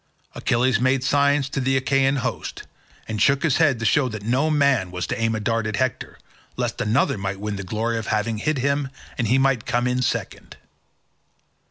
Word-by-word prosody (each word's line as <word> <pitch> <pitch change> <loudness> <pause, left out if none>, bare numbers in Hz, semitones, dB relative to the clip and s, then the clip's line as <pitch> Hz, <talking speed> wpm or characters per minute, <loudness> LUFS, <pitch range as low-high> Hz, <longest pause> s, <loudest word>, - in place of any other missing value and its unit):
Achilles 120 -1 +1
made 130 +1 +2
signs 140 0 +2
to 135 - -3
the 135 0 +1
Achaean 135 +1 +2
host, - - -4 0.4
and 110 -2 -3
shook 140 0 +3
his 155 -6 +2
head 145 -6 +3
to 115 - -4
show 130 +4 +3
that 110 -3 -7
no 130 +8 +1
man 140 -10 +2
was 90 -1 -4
to 120 +3 -4
aim 115 0 +1
a - - -2
dart 115 +1 -1
at 110 - -2
Hector, 130 +3 -2 0.4
lest - - -2
another 105 -1 +1
might 95 0 -3
win 105 0 -3
the 100 - -5
glory 115 +4 -2
of 110 - -7
having 110 0 -1
hit 155 +6 0
him 140 +1 0 0.3
and 120 - +1
he 125 +5 +3
might 135 -1 +3
himself 120 - -8
come 120 0 +1
in 125 0 0
second. 125 - -3
125 Hz, 205 wpm, -23 LUFS, 110-135 Hz, 0.4 s, shook